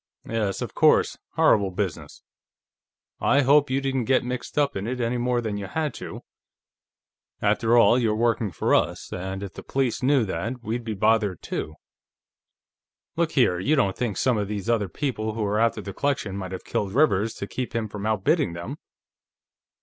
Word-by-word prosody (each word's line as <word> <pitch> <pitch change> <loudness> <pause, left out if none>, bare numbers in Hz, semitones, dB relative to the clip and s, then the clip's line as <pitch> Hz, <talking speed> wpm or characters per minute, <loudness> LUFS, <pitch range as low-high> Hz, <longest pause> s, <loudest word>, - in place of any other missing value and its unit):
"Yes, 110 -4 -1
of - - -6
course. - - +3 0.2
Horrible 100 -2 +4
business. 95 -2 -4 1.0
I 140 - +3
hope 145 +1 +4
you 130 +1 +1
didn't 135 -3 -1
get 130 +1 +3
mixed 125 +3 -5
up 145 -1 +2
in 100 +2 -3
it 125 +1 -3
any 120 +1 0
more 120 0 +1
than 110 -3 -3
you 100 -1 -5
had 150 +4 -2
to. - - -7 1.2
After 115 +1 +2
all, 120 +1 +6
you're 110 -3 +1
working 115 -1 +1
for - - 0
us, - - 0
and 95 +2 -4
if 100 - -7
the - - -8
police 135 -4 -1
knew 130 -2 +3
that, 115 +7 -4
we'd 115 +2 -3
be 110 -2 -4
bothered, 105 -3 +1
too.... 75 - -4 1.4
Look 170 -1 0
here, 110 - +3
you 145 +12 +2
don't 100 -9 +1
think 115 -7 -2
some 125 -4 +2
of 100 - -2
these 105 0 -4
other 105 -5 0
people 110 - -3
who 110 - -2
were 105 +1 0
after 115 -1 +2
the 100 -1 -7
collection 140 -8 -1
might 95 -2 -5
have 95 - -6
killed 100 -2 -2
Rivers, 115 -7 +3
to - - -5
keep 125 +3 -5
him 115 -1 -1
from 105 0 -5
outbidding 110 - +1
them?" 85 +1 -6
115 Hz, 185 wpm, -25 LUFS, 100-130 Hz, 1.4 s, all